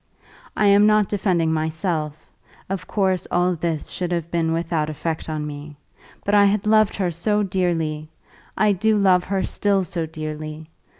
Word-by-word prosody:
I 210 - +3
am 200 +1 +6
not 215 -1 +3
defending 180 -6 +1
myself; 155 -1 -3 0.4
of 185 -2 -4
course 190 -3 0
all 180 +1 +2
this 165 -2 -3
should 180 -1 -4
have 170 -1 -2
been 165 -1 0
without 165 -2 -1
effect 160 +1 -4
on 155 -1 -3
me. 145 0 -8 0.5
But 205 - 0
I 205 -1 +6
had 200 0 +1
loved 215 -1 +4
her 185 -3 -1
so 210 +6 0
dearly! 165 -5 -1 0.5
I 215 -1 +4
do 215 +3 +2
love 185 -3 +3
her 195 0 -1
still 200 -2 +1
so 165 -1 -3
dearly! 155 0 -6
175 Hz, 165 wpm, -22 LUFS, 160-200 Hz, 0.5 s, am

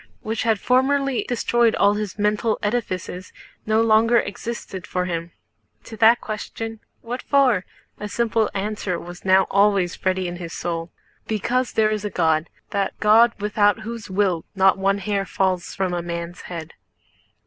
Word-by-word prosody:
which 220 +1 -3
had 225 -3 +1
formerly 270 +1 +2
destroyed 240 -1 +2
all 200 0 +4
his 210 -2 -4
mental 210 +1 +1
edifices, 185 -5 -3 0.4
no 220 +1 +3
longer 225 +1 +4
existed 200 -4 -4
for 180 0 -1
him. 170 -1 -4 0.5
To 225 - -10
that 225 +3 +6
question, 225 +1 -6 0.2
"What 245 +2 -5
for?" 255 -9 +3 0.3
a 210 - -5
simple 225 0 +1
answer 200 -2 -2
was 175 +1 -10
now 190 0 +4
always 200 -3 +2
ready 185 -1 0
in 175 0 -5
his 170 -2 -7
soul: 165 -1 -4 0.4
"Because 245 +4 -1
there 215 -1 +3
is 215 -1 -2
a 210 - -2
God, 160 -3 +1 0.2
that 200 -2 -2
God 225 +3 +5
without 205 0 +2
whose 230 -1 -7
will 185 -4 +1
not 190 0 +5
one 195 +1 +1
hair 200 0 -1
falls 185 -2 -1
from 190 -2 -1
a 175 - -1
man's 170 0 -5
head." 165 -2 -7
205 Hz, 160 wpm, -22 LUFS, 185-225 Hz, 0.5 s, that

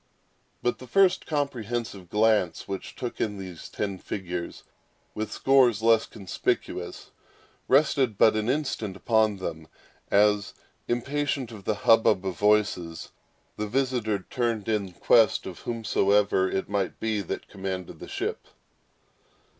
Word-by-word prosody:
But 120 -2 0
that 130 - -10
first 190 +4 +3
comprehensive 120 - -3
glance 105 -4 +2
which 95 -1 -6
took 125 -2 -5
in 105 -2 -1
those 95 -4 -8
ten 100 -3 -3
figures, 90 -3 -5 0.5
with 110 0 -4
scores 125 -5 +3
less 115 -1 +4
conspicuous, 100 -5 -3 0.6
rested 135 -5 +3
but 110 - +5
an 110 +1 0
instant 130 -8 -1
upon 110 -1 +2
them, 80 -4 -6 0.4
as, 105 0 +3 0.3
impatient 135 0 -1
of 105 -4 -11
the 110 - +1
hubbub 110 -4 +5
of 95 -2 -2
voices, 100 -6 +1 0.5
the 105 - -2
visitor 120 -5 -1
turned 115 -4 -1
in 105 -4 -1
quest 110 +4 +4
of 90 -3 -7
whomsoever 100 -4 +2
it 95 - -2
might 100 -2 -2
be 110 -2 -1
that 95 - -5
commanded 95 -2 -5
the - - -9
ship. - - -4
105 Hz, 130 wpm, -26 LUFS, 95-120 Hz, 0.6 s, but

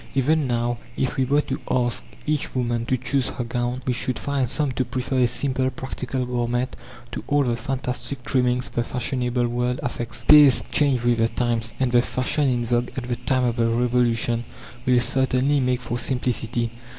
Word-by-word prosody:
Even 145 +2 +2
now, 120 0 0 0.2
if 130 - -1
we 135 -2 +1
were 145 +3 +3
to - - -5
ask 120 -2 0 0.2
each 150 -3 -1
woman 120 -2 -1
to 130 - +1
choose 130 +1 0
her 125 - -4
gown, 120 +2 -2
we 125 - +1
should 125 +1 -1
find 140 -4 -1
some 145 0 0
to 130 - 0
prefer 130 +1 -2
a 125 - +5
simple, 130 +1 0
practical 130 -1 -4
garment 125 +1 -1 0.4
to - - -5
all 145 0 +3
the 120 -3 0
fantastic 125 +1 -4
trimmings 125 -1 +1
the 120 - -1
fashionable 125 0 -1
world 125 +1 -1
affects. 120 -2 -4
Tastes 150 -3 +8
change 135 -5 +2
with 120 -1 +2
the 115 - +4
times, 115 -1 -1
and 130 -2 +1
the 120 0 +5
fashion 135 +4 0
in 120 -2 0
vogue 120 +1 0
at 125 -2 -4
the 120 - 0
time 125 +2 0
of 120 -1 0
the 115 -1 +2
Revolution 120 -1 +1 0.4
will 125 -1 +5
certainly 130 +3 +2
make 125 -1 0
for 120 0 -3
simplicity. 120 -2 -1
125 Hz, 185 wpm, -23 LUFS, 120-130 Hz, 0.4 s, Tastes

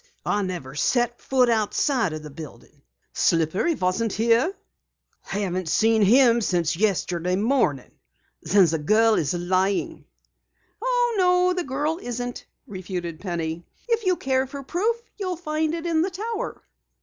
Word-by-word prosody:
I 205 - +1
never 175 -9 -5
set 240 - 0
foot 255 -2 +2
outside 230 - +1
the 155 -1 -7
building." 155 +1 -12 0.3
"Slippery 170 - +1
wasn't 195 +2 -1
here?" 230 - +2 0.7
"Haven't 185 -3 -3
seen 225 +4 +3
him 235 +3 +5
since 175 -4 0
yesterday 180 -2 0
morning." 205 - 0 0.5
"Then 190 +4 +4
the 160 -1 0
girl 220 +8 +3
is 160 -5 0
lying!" 185 +3 -1 0.8
"Oh, - - +1
no, 360 0 +3
the 360 -1 -2
girl 295 +5 -1
isn't," 245 0 -5 0.2
refuted 180 -4 -6
Penny. 170 -3 -4 0.2
"If 460 -1 +1
you 370 -2 +2
care 265 -3 0
for 275 +1 -8
proof 430 - -1 0.2
you'll 370 -3 -2
find 315 -1 -1
it 335 0 -6
in 330 -2 +1
the 365 - 0
tower." 445 +5 -5
225 Hz, 135 wpm, -24 LUFS, -, 0.8 s, him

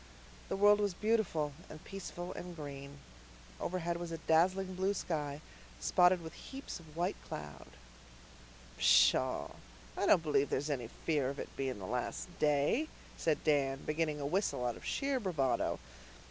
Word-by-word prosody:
The - - 0
world 205 +1 +6
was 205 -3 0
beautiful 200 -9 +1 0.2
and 155 - -10
peaceful 180 -2 -6
and 180 -1 -7
green. 140 -2 -7 0.6
Overhead 170 -1 -1
was 170 -1 -5
a 165 - -3
dazzling 185 +4 +2
blue 190 +2 0
sky, 150 -5 -2 0.4
spotted 180 -1 +4
with 160 - -7
heaps 270 -7 -7
of 160 -1 -15
white 180 +3 0
cloud. 75 -2 -7 1.1
"Pshaw, - - +5 0.5
I - - 0
don't 165 - +6
believe 145 -3 +2
there's 145 +3 0
any 125 -5 -2
fear 145 +1 -1
of 140 - -5
it - - -7
being 130 -3 -2
the 95 - -7
last 125 - -3
day," 150 - +3 0.3
said 160 -2 0
Dan, 140 -3 +2
beginning 155 -1 0
a 140 - -3
whistle 145 -6 0
out 120 - 0
of - - -12
sheer 275 -2 0
bravado. 155 - 0
160 Hz, 155 wpm, -34 LUFS, 140-185 Hz, 1.1 s, world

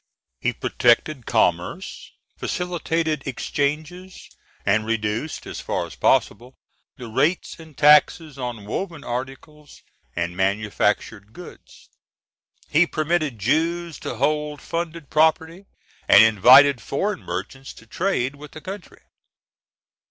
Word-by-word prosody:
He - - 0
protected 125 +2 +1
commerce, 90 - -1 0.3
facilitated 165 -4 -2
exchanges, 155 +8 -4 0.3
and 105 +2 +2
reduced, 115 +5 -3
as - - -7
far - - -2
as - - -11
possible, 125 +2 0 0.4
the 125 - -8
rates 155 +11 -1
and 160 -3 -14
taxes 150 0 +4
on 120 -5 -5
woven 165 - -5
articles 135 +4 -8 0.3
and 85 0 -3
manufactured 105 +2 -1
goods. 180 - -14 0.8
He 165 +4 +3
permitted 155 -5 -1
Jews 165 - -1
to - - -5
hold 150 +3 -1
funded 165 -3 -5
property, 160 +4 +1 0.4
and - - +8
invited 125 +5 +6
foreign 200 +8 -2
merchants 100 +10 -6
to 115 - -16
trade 140 - -1
with 150 +1 -12
the 155 - -10
country. 195 +4 -10
145 Hz, 110 wpm, -22 LUFS, 115-165 Hz, 0.8 s, and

